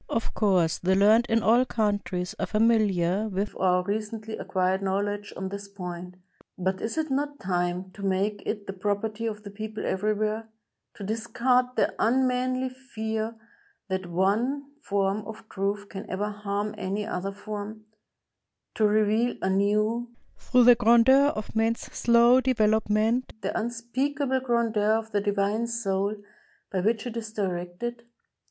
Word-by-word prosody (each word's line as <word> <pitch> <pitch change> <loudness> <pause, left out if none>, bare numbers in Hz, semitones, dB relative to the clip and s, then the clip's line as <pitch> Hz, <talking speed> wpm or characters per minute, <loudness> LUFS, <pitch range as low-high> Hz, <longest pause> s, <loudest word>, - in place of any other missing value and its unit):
Of 230 - -2
course, 185 -6 +2
the 190 +1 +2
learned 215 +4 +5
in 225 0 +2
all 235 +3 +5
countries 205 -6 -1
are - - -1
familiar 215 -3 +2
with 200 +1 -2
our 180 -1 +2
recently 215 +2 -3
acquired 185 0 0
knowledge 205 +1 -2
on 190 0 -3
this 200 +1 -6
point; 180 -2 -7 0.4
but 190 +1 -1
is 225 - -3
it 315 -2 -1
not 285 +1 -1
time 180 0 -1
to 200 - -12
make 195 +2 0
it 210 -2 -3
the 195 - -5
property 210 +3 -2
of 210 -1 -5
the 200 - -8
people 215 +1 -6
everywhere 215 +2 -1 0.2
— - - -57
to - - -8
dis 220 +3 -3
card 250 0 +3
the - - +2
unmanly 255 +1 +1
fear 225 -4 -4 0.5
that 190 -1 -2
one 225 +11 0
form 200 +1 0
of 220 0 -9
truth 200 +1 -2
can 195 0 -8
ever 205 +3 -2
harm 205 0 -3
any 200 +2 -2
other 195 -2 -3
form 210 +1 -7 0.4
— - - -59
to 215 - +3
reveal 215 +3 +2
anew, 210 +5 +1 0.3
through 250 -1 +3
the 245 +1 +9
grandeur 240 +4 +5
of 215 +1 -6
Man's 225 +1 +1
slow 235 +2 +4
development, 220 0 +2
the - - -3
unspeakable 255 +4 -1
grandeur 230 -4 +1
of 220 0 -1
the 205 -1 +1
Divine 205 +3 0
Soul 200 -3 -1 0.6
by 190 - 0
which 220 +3 +1
it 240 -2 -5
is 225 -2 -5
directed? 190 +3 -3
215 Hz, 150 wpm, -27 LUFS, 195-230 Hz, 0.6 s, the